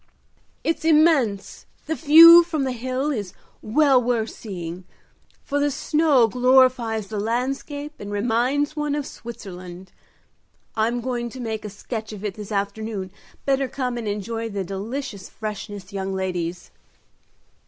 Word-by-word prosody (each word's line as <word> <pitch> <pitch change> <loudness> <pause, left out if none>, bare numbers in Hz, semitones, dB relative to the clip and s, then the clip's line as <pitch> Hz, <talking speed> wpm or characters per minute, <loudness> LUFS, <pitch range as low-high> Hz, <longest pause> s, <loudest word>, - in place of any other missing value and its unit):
"It's 325 - -1
immense! 300 - +2 0.2
The 320 - -1
view 330 +2 +9
from 325 -4 -2
the 260 - -1
hill 255 +4 -2
is 205 -9 -4 0.3
well 270 +3 +4
worth 230 -2 -1
seeing, 180 -4 -7 0.6
for 285 - -1
the 290 0 +2
snow 290 -3 +3
glorifies 250 -3 +3
the 215 -2 -3
landscape 275 +6 -3
and 205 0 -7
reminds 245 +8 0
one 295 -1 -1
of 295 -2 -2
Switzerland. 185 -7 -9 0.8
I'm 230 +2 0
going 240 -1 -3
to 260 - -10
make 220 -3 -4
a 210 - -5
sketch 220 +2 -6
of 210 0 -7
it 205 - -2
this 210 +1 -9
afternoon; 200 -1 -3 0.3
better 275 -1 +1
come 250 -1 -3
and 235 -2 -4
enjoy 225 +3 -3
the 200 -2 -3
delicious 200 +3 -5
freshness, 205 -2 -7
young 195 -1 -3
ladies." 180 -2 -3
230 Hz, 140 wpm, -23 LUFS, 205-275 Hz, 0.8 s, view